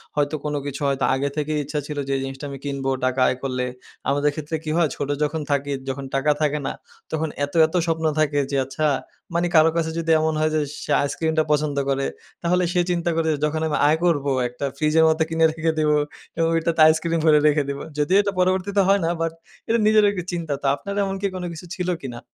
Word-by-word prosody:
হয়তো 145 +1 +1
কোন 150 - -1
কিছু 145 +1 -5
হয়তো 135 -1 0
আগে 140 +2 -1
থেকেই 150 0 -1
ইচ্ছা 150 +2 -3
ছিল 150 - -5
যে, - - -2
এই - - -3
জিনিসটা 135 +2 -6
আমি 140 - -6
কিনবো 140 -1 -2 0.2
টাকা 130 +1 0
আয় 130 - 0
করলে। 130 -2 -1 0.4
আমাদের 145 +1 +2
ক্ষেত্রে 155 +1 -4
কি 155 - -5
হয়? 165 -4 +3
ছোট 140 - -4
যখন 150 +1 -1
থাকি 140 0 0 0.2
যখন 135 +1 -4
টাকা 145 +2 +2
থাকে 150 0 +1
না - - -2 0.4
তখন 160 0 -1 0.2
এত, 145 - -15
এত 160 - -8
স্বপ্ন 160 -1 0
থাকে 150 -2 +2
যে, - - -1
আচ্ছা 145 +4 -2 0.5
মানে 170 +1 +1
কারো 160 0 +7
কাছে 160 -1 0
যদি 165 0 0
এমন 160 0 +1
হয় 155 0 +1
যে, 155 - +2 0.2
সে - - -4
আইসক্রিমটা 160 +2 0
পছন্দ 150 -1 +1
করে, 135 0 0 0.4
তাহলে 180 +1 +2
সে 180 - +3
চিন্তা 170 0 0
করে 160 -1 +1 0.2
যখন 155 +1 -1
আমি 150 - 0
আয় 155 +2 +4
করবো 145 -5 +2 0.2
একটা 125 +3 -5
ফ্রিজের 155 +2 +3
মধ্যে 160 0 +2
কিনে 165 0 +3
রেখে 160 0 0
দিবো। 150 -1 +3 0.4
এবং 165 -1 +2
ওইটাতে 165 0 +1
আইসক্রিম 165 +1 +2
ভরে 155 -1 +6
রেখে 150 -1 +3
দিবো। 140 0 -4
যদিও 150 +6 +3
এটা 200 -1 -1
পরবর্তীতে 190 +2 +2
হয় 200 +1 +4
না, 165 - +1
বাট 165 0 -1 0.3
এটা 230 0 +2
নিজের 215 0 +5
একটা 180 -4 -4
চিন্তা। 165 -4 -3
তো - - -7
আপনার 200 +7 -6
এমন 195 0 -2
কি 200 - +1
কোন 180 - -4
কিছু 165 +2 -9
ছিল 180 -2 -3
কিনা? 120 -3 -6
155 Hz, 225 wpm, -23 LUFS, 145-165 Hz, 0.5 s, কারো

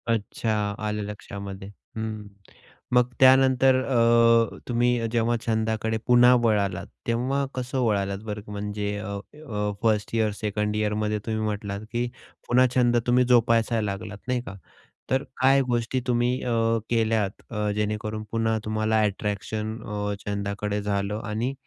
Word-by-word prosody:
अच्छा, 105 -2 -1
आलं 105 -1 -2
लक्षामध्ये 100 -1 -7 0.3
हं. 110 -1 -4 0.7
मग 125 0 +4
त्यानंतर 130 0 +6
अ, 115 -2 +4
तुम्ही 120 -1 +1
जेव्हा 120 0 +1
छंदाकडे 110 0 0
पुन्हा 125 0 +7
वळालात, 100 -5 +1 0.2
तेव्हा 130 +4 0
कसं 130 +1 -2
वळालात 100 -3 0
बरं? 105 -1 -5
म्हणजे 105 0 -3
अ, 105 +1 -6 0.4
अ, 105 -3 -1
1st 110 -1 +1
इयर, 110 -2 +2
2nd 105 0 -1
इयरमध्ये 105 0 0
तुम्ही 110 -1 -2
म्हटलात, 105 -1 -3
की 120 0 -1 0.4
पुन्हा 125 +1 +5
छंद 120 -1 +4
तुम्ही 125 +1 +4
जोपासायला 115 -3 +3
लागलात, 100 0 -7
नाही 125 -1 0
का? 100 -5 -9 0.5
तर 130 +1 +1 0.2
काय 135 +1 +5
गोष्टी 120 +1 0
तुम्ही 120 0 +2
अ, 120 - -1 0.4
केल्यात 110 -3 0
अ, 105 -1 -1
जेणेकरून 105 +1 -2
पुन्हा 115 -1 +1
तुम्हाला 110 0 +1
अट्रॅक्शन 105 +2 -2
अ, 105 -1 -3
छंदाकडे 100 0 -2
झालं 100 +1 -1
आणि 115 +5 -2
110 Hz, 135 wpm, -25 LUFS, 105-120 Hz, 0.7 s, पुन्हा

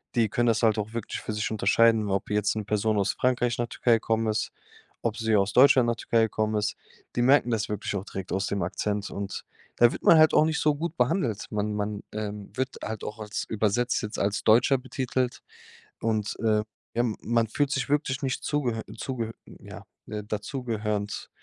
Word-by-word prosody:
Die 115 -3 +3
können 120 +3 +1
das 115 0 +2
halt 110 -2 +3
auch 105 +1 -3
wirklich 115 -2 -4
für 110 - -4
sich 105 0 -1
unterscheiden, 110 0 +3
ob 95 0 -1
jetzt 105 0 +1
'ne 110 -1 -3
Person 105 +1 +1
aus 100 - +1
Frankreich 125 -1 +1
nach 120 - -1
Türkei 120 +1 +2
gekommen 115 0 +1
ist, 105 -2 -1 0.5
ob 115 -1 -1
sie 110 -1 +1
aus 100 0 +2
Deutschland 130 -2 +6
nach 115 - +1
Türkei 115 0 +1
gekommen 110 0 0
ist. 105 -2 -1 0.4
Die 120 - +1
merken 130 -1 +5
das 110 -2 -1
wirklich 105 0 -3
auch 95 - -3
direkt 95 -3 -7
aus 95 +1 0
dem 100 - -2
Akzent. 100 +3 -2
Und 100 -1 -5 0.3
da 120 0 +6
wird - - -7
man 165 - +7
halt 155 - +6
auch 155 - +6
nicht 160 0 0
so 150 -1 +2
gut 165 +2 -4
behandelt. 125 - 0
Man 105 0 -2
man, 105 0 -3
ähm, 105 -1 -5
wird 130 0 -2
halt 110 -2 -5
auch 105 - -5
als, 105 -1 -4
übersetzt 110 +3 0
jetzt 105 - -4
als 100 +1 0
„Deutscher“ 120 +5 +5
betitelt. 130 -1 -2 0.6
Und, 110 -2 -1
äh, 110 -2 +2 0.4
ja, 120 - +1
m 115 -3 -1
man 115 -1 +1
fühlt 145 +5 0
sich 135 -2 -1
wirklich 145 -1 0
nicht 130 -1 -2
zugehör 125 -7 -1
zugehör 115 -4 -4
äh, - - -13
ja, - - -9 0.2
dazu 105 +5 -4
gehörend, 105 -3 -3
110 Hz, 205 wpm, -27 LUFS, 105-125 Hz, 0.6 s, man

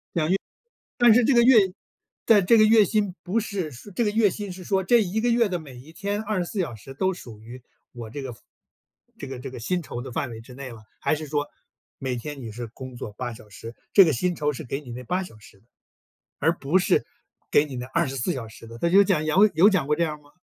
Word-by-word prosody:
讲 155 -3 +1
月 185 - +4 0.6
但 240 -2 +7
是 245 +2 +5
这 270 - +3
个 235 - +6
月 245 0 +7 0.7
但 205 -4 +5
这 230 +5 +6
个 215 - +7
月 215 -1 +6
薪 205 -3 0
不 195 +5 0
是 195 -7 -4
说 130 - -12
这 220 +6 0
个 210 - +1
月 215 -1 +3
薪 205 0 -6
是 180 0 -9
说 190 +1 0
这 235 +4 +4
一 205 +2 -1
个 240 - +1
月 235 -2 +3
的 180 -2 -2
每 145 -5 -12
1 135 +6 -13
天 205 +3 -3
24 205 -2 -2
小 155 -11 -2
时 135 +5 -11
都 190 +7 0
属 115 -11 -11
于 120 +3 -11 0.3
我 115 -2 -8
这 140 +6 -6
个 130 -3 -6 0.8
这 140 - -7
个 130 -1 -7
这 135 +2 -6
个 130 - -8
薪 175 +10 -1
酬 120 -6 -6
的 130 0 -8
范 130 +2 -2
围 115 -1 -8
之 125 +3 -14
内 135 +1 -8
了。 115 -3 -12 0.2
还 - - +1
是 155 0 -7
说 145 0 -1 0.5
每 130 -2 -3
天 140 +3 -7
你 115 -3 -7
是 120 +2 -6
工 130 +2 -10
作 115 - -7
8 120 +2 -5
小 110 -1 -14
时， 115 +3 -10 0.2
这 195 - +9
个 160 - +2
薪 180 +8 0
酬 150 -1 -1
是 150 - -7
给 135 +1 -4
你 135 -5 -11
那 125 +2 -7
8 180 +9 -1
小 145 -12 -12
时 105 -1 -18
的？ 105 - -32 0.7
而 165 - +3
不 160 +3 +1
是 180 - +2 0.5
给 145 - +5
你 135 -3 -7
那 125 0 -5
24 135 0 -1
小 125 -6 -5
时 115 +1 -13
的， 115 +1 -10
他 170 - +1
就 195 +4 +7
讲 180 -6 +1
有 195 +7 +5
有 175 +6 +6
讲 190 -9 +1
过 150 - +2
这 170 - 0
样 150 -2 -4
吗？ 145 0 -23
155 Hz, 260 characters per minute, -25 LUFS, 125-195 Hz, 0.8 s, 这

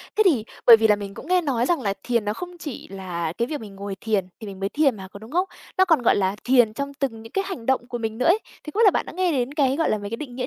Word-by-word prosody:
Thế 435 - +4
thì 280 - +4 0.2
bởi 230 -2 +10
vì 220 0 +3
là 210 - +5
mình 200 -1 -7
cũng 275 - -10
nghe 365 0 +3
nói 255 -7 0
rằng 345 +4 +1
là 200 -2 0
thiền 235 -4 0
nó 210 - 0
không 355 +7 -8
chỉ 295 -7 -7
là 175 -4 -4
cái 235 - +1
việc 295 +1 -4
mình 205 -3 -10
ngồi 200 0 -5
thiền 210 -5 0
thì 220 - -8
mình 195 -1 -8
mới 195 0 -1
thiền 280 +1 +2
mà, 190 -1 -8
có 200 - -10
đúng 220 +3 -12
không? 360 +4 +1 0.3
Nó 375 - +6
còn, 325 -7 +3
gọi 235 - +4
là, 190 0 +1
thiền 245 -4 +4
trong 280 +4 -4
từng 265 -5 -3
những 225 - -12
cái 390 - 0
hành 260 -13 -6
động 260 -1 +1
của 245 - -4
mình 225 -1 -4
nữa 250 - -1
ấy. 355 +6 +5 0.2
Thì 300 - -7
không 425 - -2
biết 460 - +6
là 400 - +7
bạn - - -1
đã - - -8
nghe 365 0 +1
đến 265 -2 -1
cái, 275 -3 +2
gọi 325 +2 +1
là, 215 - +1
mấy 205 -1 -6
cái 230 - -4
định 255 -4 -8
nghĩa 250 0 -2
245 Hz, 340 wpm, -23 LUFS, 210-300 Hz, 0.3 s, bởi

